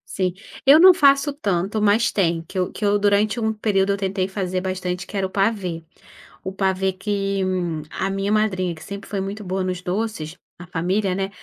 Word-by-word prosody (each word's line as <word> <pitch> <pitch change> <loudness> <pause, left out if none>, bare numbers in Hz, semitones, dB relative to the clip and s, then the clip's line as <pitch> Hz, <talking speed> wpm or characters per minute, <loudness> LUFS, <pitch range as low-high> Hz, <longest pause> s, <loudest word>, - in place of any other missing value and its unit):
Sim, 185 -2 0 0.3
eu 280 +3 +8
não 370 +2 +9
faço 280 -2 +4
tanto, 205 - -1
mas 215 +2 +3
tem, 170 -4 +1
que 180 +4 -9
eu 180 -1 0
que 210 - -4
eu 205 0 +3
durante 205 +3 +2
um 220 0 +1
período 200 -2 +1
eu 200 - 0
tentei 190 -1 -1
fazer 185 -2 -2
bastante, 180 -1 -3
que 205 - -6
era 190 -1 0
o - - -16
pavê. 195 -4 -1 0.6
O 190 - -4
pavê 190 0 0
que, 195 0 -2
hum, 175 -4 -1
a 195 - -2
minha 195 +1 -1
madrinha 190 -5 +1
que 160 - -13
sempre 200 +4 -8
foi 200 - -2
muito 200 +2 -5
boa 185 0 -2
nos 180 -1 -3
doces 180 -3 -3 0.2
na 175 - -10
família, 180 +3 -1
né, 195 +1 -2
195 Hz, 205 wpm, -22 LUFS, 185-210 Hz, 0.6 s, não